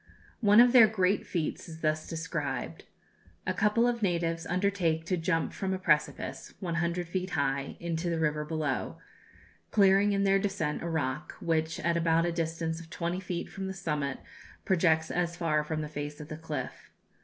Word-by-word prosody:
One 210 -1 +6
of 245 0 +8
their 235 -4 +9
great 200 -2 +1
feats 170 0 -3
is 160 0 -10
thus 155 0 0
described: 145 - -4 0.6
A - - 0
couple 215 +3 +3
of 235 -1 -1
natives 170 -3 0
undertake 180 -4 0
to 185 - 0
jump 165 -1 0
from 190 -1 -2
a - - -3
precipice, 150 -5 0
one 175 -3 -3
hundred 175 0 -1
feet 185 +2 -2
high, 135 0 -1
into 170 0 -2
the 165 - 0
river 150 -1 0
below, 150 -4 -2 0.7
clearing 200 0 +5
in 200 0 +1
their 195 0 +4
descent 195 -7 -1
a 170 - -3
rock, 150 -2 -2
which 160 -1 0
at 170 +1 +1
about 165 0 +3
a 175 - 0
distance 165 -1 -2
of 165 -1 -12
twenty 170 +1 -2
feet 180 -2 -4
from 195 -1 -6
the 190 - -4
summit, 150 -6 -2 0.5
projects 160 -3 +2
as 170 -1 -1
far 155 -3 +1
from 155 0 -3
the 150 - -3
face 145 0 -6
of 150 0 -9
the 155 - -5
cliff. 150 -5 -6
165 Hz, 180 wpm, -30 LUFS, 155-185 Hz, 0.7 s, their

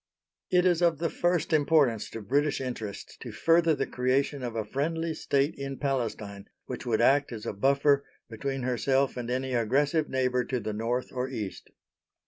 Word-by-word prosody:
It 180 0 +3
is 175 -2 +3
of 170 -3 +3
the 165 +1 -1
first 175 -2 0
importance 145 -7 +3
to 115 - -7
British 145 +6 +1
interests 120 -6 -6
to - - -8
further 165 -1 +3
the 135 - -1
creation 130 +2 0
of 120 -2 -4
a 110 -2 -2
friendly 160 +7 -2
State 140 0 0
in 135 -1 -4
Palestine 110 -7 -3 0.2
which - - -6
would 115 -1 +2
act 140 +3 +4
as 110 -3 -7
a - - -3
buffer 140 +5 +3 0.2
between 135 +4 -4
herself 130 +2 +1
and 120 -1 -5
any 130 +1 -1
aggressive 140 +7 +1
neighbour 125 -1 +1
to 125 - -2
the 110 -1 -4
North 115 +4 -2
or 125 +1 -2
East. 105 -7 -6
135 Hz, 175 wpm, -28 LUFS, 120-145 Hz, 0.2 s, act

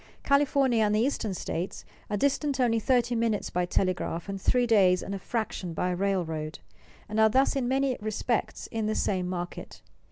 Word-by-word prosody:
California 280 -4 +3
and 210 0 +2
the - - +2
eastern 235 -3 0
states 180 -1 -4 0.2
are 210 - -1
distant 280 +2 0
only 230 -3 +3
thirty 245 +1 +2
minutes 225 -3 0
by 180 0 0
telegraph 180 -2 -1
and 195 -1 -5
three 250 +4 +2
days 190 -6 +4
and 200 - -5
a 195 - -4
fraction 195 -6 -3
by 180 - 0
railroad, 175 -5 -2 0.5
and 215 +1 -2
are 220 0 +6
thus 265 +5 +2
in 265 -3 0
many 265 0 +1
respects 215 +2 -2
in 225 -2 -1
the 215 - 0
same 185 -2 0
market. 175 -1 -6
215 Hz, 180 wpm, -28 LUFS, 185-245 Hz, 0.5 s, are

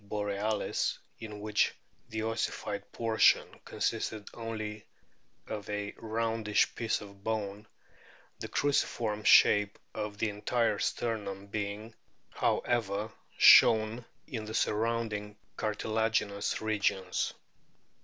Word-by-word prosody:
borealis, 105 +1 -1 0.2
in 105 -2 -7
which 105 0 +1 0.4
the 110 -1 -3
ossified 115 0 -3
portion 115 -1 +3 0.2
consisted 110 -2 -2
only 110 -2 -5 0.6
of 105 -2 -6
a 105 0 -3
roundish 115 -1 0
piece 115 -2 -1
of 100 -1 -13
bone, 105 -1 -3 0.7
the - - -5
cruciform 115 -6 0
shape 105 -1 +6 0.2
of 105 -1 -4
the 110 - 0
entire 105 +1 0
sternum 100 -4 -2
being, 105 +2 -4 0.4
however, 110 -3 0 0.3
shown 110 +2 +7 0.2
in 110 -3 -5
the 110 +1 -5
surrounding 105 -2 -1 0.2
cartilaginous 110 -1 -1
regions. 100 -4 0
110 Hz, 95 wpm, -31 LUFS, 105-110 Hz, 0.7 s, shown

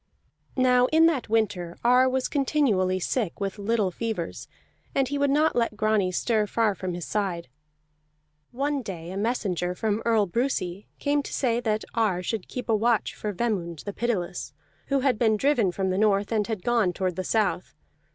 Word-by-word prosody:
Now 250 -1 +4
in 320 +3 +5
that 300 -9 +1
winter 200 -6 0
Ar 250 +2 +5
was 260 0 0
continually 245 -11 +1
sick 205 -1 -2
with 200 +1 -3
little 205 -2 +1
fevers, 215 -4 -4 0.5
and 270 -1 +2
he 285 +2 -2
would 285 0 +2
not 300 +3 +3
let 230 -3 0
Grani 215 -3 +2
stir 215 +2 +1
far 220 -1 +1
from 185 -2 -4
his 175 - -5
side. 185 -8 -2 1.0
One 280 +2 -1
day 175 -6 -7
a - - -6
messenger 195 -5 -1
from 215 +2 -1
Earl 225 -3 +3
Brusi 195 -3 -2
came 290 0 +1
to - - -8
say 240 -3 +1
that 220 -2 -1
Ar 210 -6 +1
should 210 0 -3
keep 250 - -6
a 225 - +3
watch 225 +1 +1
for 210 - -4
Vemund 185 -7 -2
the 205 - -5
Pitiless, 190 - -2 0.3
who 275 -1 +1
had 255 -4 +1
been 220 -2 +3
driven 240 -6 +2
from 190 +1 -1
the 185 - 0
north, 205 -1 +2
and 215 -2 +1
had 215 -5 -4
gone 230 -7 +2
toward 185 -1 -2
the 185 - -3
south. 215 +1 0
215 Hz, 180 wpm, -26 LUFS, 185-245 Hz, 1.0 s, in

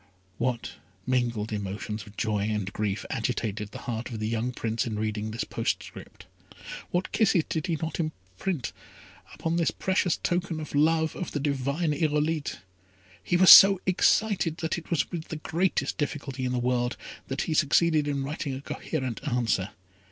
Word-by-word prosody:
What 120 -6 -2 0.3
mingled 120 -4 0
emotions 105 +1 -4
of 105 - -15
joy 105 -2 0
and 105 -2 -2
grief 105 -1 -2
agitated 110 -3 -2
the - - -9
heart 120 0 -3
of 115 -3 -5
the 110 - -2
young 115 +2 -1
Prince 115 -1 -2
in 110 -2 -3
reading 110 0 -2
this 110 +2 -3
postscript. - - -4 0.6
What 180 +1 -1
kisses 200 -6 +3
did 160 -2 -2
he 170 - 0
not 160 +3 -4
imprint 135 - -4 0.7
on 165 +1 +1
this 170 - +2
precious 190 -2 0
token 175 -2 -1
of 155 - -7
the 145 - +1
love 160 +1 +2
of 180 - -5
the 145 - -1
divine 140 +3 0
Irolite! 150 0 0 0.6
He 175 - +2
was 185 0 +9
so 195 -1 +11
excited 185 -2 +2
that 160 -2 -1
it 165 - -16
was 170 - 0
with 165 -3 -5
the - - -5
greatest 160 -1 -1
difficulty 140 -3 -3
in 125 - -1
the 125 - 0
world 125 0 0 0.3
that 135 - -2
he 160 - -1
succeeded 155 0 +3
in 140 -1 -1
writing 140 -1 -3
a 135 - -6
coherent 130 -6 -4
answer. 115 -7 0
140 Hz, 170 wpm, -27 LUFS, 115-160 Hz, 0.7 s, so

